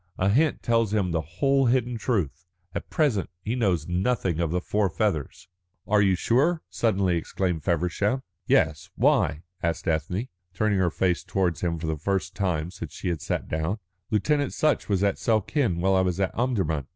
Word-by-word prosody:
A 95 - +2
hint 145 +9 +2
tells 115 -3 +2
him 95 -4 +1
the 80 -1 0
whole 135 - +1
hidden 125 0 +1
truth. 95 - -1 0.3
At - - -5
present 140 - +1
he 110 - -2
knows 95 -11 +1
nothing 90 -1 0
of 85 -2 +1
the 90 +3 0
four 100 +2 0
feathers." 80 -5 -2 0.4
"Are 105 0 +3
you 95 -2 +4
sure?" 145 - +2
suddenly 95 -6 +1
exclaimed 85 -1 -2
Feversham. 90 - 0 0.2
"Yes. 80 -4 +2
Why?" 75 +3 +2 0.2
asked 85 +1 -2
Ethne, 85 - -1 0.3
turning 105 0 +1
her 90 -2 +3
face 90 +1 0
towards 90 -4 -1
him 85 -2 0
for 80 - -5
the 80 -1 -1
first 95 +4 -1
time 90 -4 -1
since 85 -5 -8
she - - -3
had 85 -4 -2
sat - - -2
down. 80 +6 -1 0.3
"Lieutenant 145 +6 +1
Sutch 155 -6 +1
was 100 -1 +1
at 100 -1 +1
Suakin 110 - +1
while 95 +1 +3
I 95 - +4
was 90 0 0
at 95 -1 0
Omdurman. 95 - 0
95 Hz, 180 wpm, -26 LUFS, 85-110 Hz, 0.4 s, you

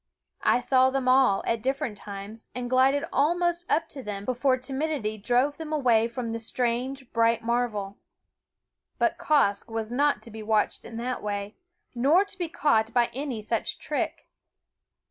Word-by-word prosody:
I 245 - +3
saw 260 +1 +4
them 265 -1 -1
all, 255 -6 +4
at 230 -1 0
different 265 -3 -1
times, 205 +2 -9
and 245 0 -4
glided 265 +2 +4
almost 345 +3 +1
up 325 0 +2
to 275 - -8
them 205 -3 -5
before 255 +2 +2
timidity 265 -4 -3
drove 250 +7 +1
them 320 -1 -7
away 240 -7 +3
from 235 0 -4
the 230 - -3
strange 250 +3 -2
bright 230 0 +2
marvel. 225 -4 -1 1.0
But - - +1
Quoskh 235 -9 +2
was 225 0 -3
not 285 +3 +1
to 230 - -11
be 220 +1 -8
watched 215 0 0
in 230 -1 -8
that 250 +2 -3
way, 205 0 -4 0.4
nor 290 +11 +4
to 400 - -11
be 350 -3 -3
caught 225 -8 +2
by 240 -1 +3
any 260 -4 -4
such 225 +1 -1
trick. - - -3
245 Hz, 165 wpm, -27 LUFS, 225-275 Hz, 1.0 s, saw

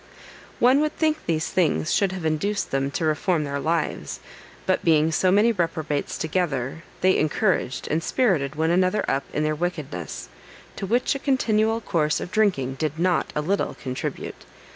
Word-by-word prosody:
One 255 +3 +5
would 305 0 -1
think 310 -1 0
these 160 -1 0
things 155 - +1
should 195 -2 +2
have 185 -3 -5
induced 195 +6 -1
them 135 0 0
to 160 +3 -2
reform 155 +2 +1
their 140 -1 -3
lives; 160 +2 -2 0.5
but - - +1
being 160 -1 +4
so 180 +3 +2
many 210 +4 +5
reprobates 165 -7 -2
together, 155 -4 -1 0.2
they 185 +1 +4
encouraged 155 - 0
and 160 +2 0
spirited 165 - +1
one 160 +2 +1
another 185 +3 +2
up 135 0 0
in 150 - -1
their 155 0 +1
wickedness, 155 - -4 0.5
to 195 - -4
which 240 +5 +2
a 275 - -4
continual 225 -5 +1
course 155 -6 0
of 175 - -6
drinking 140 -12 +1
did 155 -1 -1
not 180 +1 +1
a 150 - +1
little 195 +6 -1
contribute. 130 -2 -5
165 Hz, 165 wpm, -24 LUFS, 150-200 Hz, 0.5 s, One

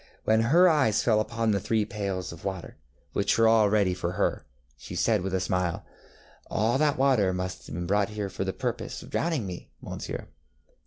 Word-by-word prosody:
When 110 +1 +3
her 165 +11 +5
eyes 140 - +3
fell 110 -3 +3
upon 115 0 0
the 100 - +1
three 105 +2 0
pails 100 -3 -4
of 85 - -11
water, 95 -3 -5 0.4
which 100 0 +1
were 115 0 +5
all 110 -2 +5
ready 100 -3 +2
for 90 -1 -3
her, - - -1 0.3
she - - -9
said - - +2
with 95 +1 -3
a - - +1
smile, 90 -2 -1 0.6
ŌĆ£All 115 +5 +1
that 150 -2 +2
water 130 -8 +3
must 90 0 -5
have 75 - -7
been 85 +1 -3
brought 100 +2 +1
here 105 -1 -3
for 95 - -4
the - - -1
purpose - - -4
of - - -13
drowning 160 -9 0
me, 90 -2 -7
Monsieur. - - -6
105 Hz, 200 wpm, -27 LUFS, 95-115 Hz, 0.6 s, her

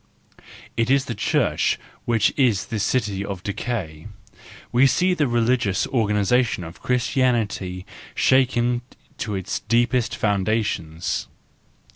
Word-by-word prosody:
It 115 +1 0
is 135 0 +3
the 120 - -3
Church 100 - +1 0.3
which 115 -3 +2
is 120 -8 +2
this 105 - 0
city 105 -3 0
of 100 -2 -6
decay: 100 -7 -4 0.6
we 130 +3 +5
see 180 +7 +2
the 150 -5 +1
religious 120 -4 +1
organisation 110 -1 +1
of 80 0 -10
Christianity 115 -7 0 0.3
shaken 125 -2 +2 0.4
to 105 -3 -3
its 95 -2 -3
deepest 120 0 +1
foundations. 100 -5 -1
115 Hz, 110 wpm, -23 LUFS, 100-125 Hz, 0.6 s, we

